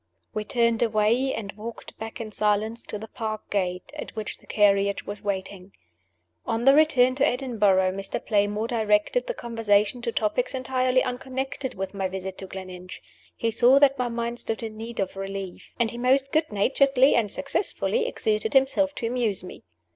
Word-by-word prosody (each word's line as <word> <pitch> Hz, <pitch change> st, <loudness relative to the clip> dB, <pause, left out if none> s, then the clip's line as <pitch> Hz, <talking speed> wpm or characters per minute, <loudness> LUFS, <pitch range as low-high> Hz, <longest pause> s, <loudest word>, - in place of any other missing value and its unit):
We 215 Hz, 0 st, -3 dB
turned 235 Hz, -1 st, +1 dB
away, 230 Hz, +3 st, +2 dB
and 205 Hz, -5 st, -4 dB
walked 220 Hz, +3 st, -9 dB
back 220 Hz, 0 st, -6 dB
in 220 Hz, -2 st, -6 dB
silence 215 Hz, +2 st, 0 dB
to 210 Hz, -, -4 dB
the 220 Hz, +2 st, -8 dB
park 215 Hz, -1 st, -5 dB
gate, 180 Hz, -3 st, -2 dB
at -, -, -7 dB
which 215 Hz, -1 st, -5 dB
the -, -, -23 dB
carriage 200 Hz, -1 st, +2 dB
was 205 Hz, 0 st, -6 dB
waiting. 195 Hz, -1 st, -4 dB, 0.7 s
On 230 Hz, +2 st, -2 dB
the 270 Hz, -, +8 dB
return 275 Hz, -4 st, +5 dB
to 265 Hz, -, +2 dB
Edinburgh, 210 Hz, -8 st, +2 dB
Mr. 195 Hz, +1 st, -4 dB
Playmore 210 Hz, +1 st, +1 dB
directed 220 Hz, -, +1 dB
the -, -, -2 dB
conversation 225 Hz, -1 st, +1 dB
to 240 Hz, -1 st, -2 dB
topics 245 Hz, +5 st, 0 dB
entirely 255 Hz, 0 st, +1 dB
unconnected 260 Hz, +1 st, -4 dB
with 195 Hz, +1 st, -4 dB
my 195 Hz, -1 st, -1 dB
visit 190 Hz, 0 st, -6 dB
to 190 Hz, -, -6 dB
Gleninch. 185 Hz, -1 st, -8 dB, 0.4 s
He 230 Hz, -, -1 dB
saw 245 Hz, +4 st, +5 dB
that 275 Hz, -1 st, +4 dB
my 250 Hz, -, +1 dB
mind 235 Hz, 0 st, -3 dB
stood 225 Hz, +1 st, -4 dB
in 220 Hz, -1 st, -5 dB
need 225 Hz, +2 st, -7 dB
of 195 Hz, -1 st, -2 dB
relief; 195 Hz, -1 st, -7 dB
and 235 Hz, -2 st, +2 dB
he 235 Hz, -, -7 dB
most 265 Hz, +2 st, +2 dB
good 310 Hz, -3 st, +1 dB
naturedly, 270 Hz, +6 st, +4 dB
and 215 Hz, -4 st, +1 dB
successfully, 410 Hz, -, -1 dB
exerted 215 Hz, -, -1 dB
himself 280 Hz, +2 st, +3 dB
to -, -, -4 dB
amuse 230 Hz, -6 st, -1 dB
me. 180 Hz, -, -10 dB
225 Hz, 175 wpm, -25 LUFS, 200-255 Hz, 0.7 s, the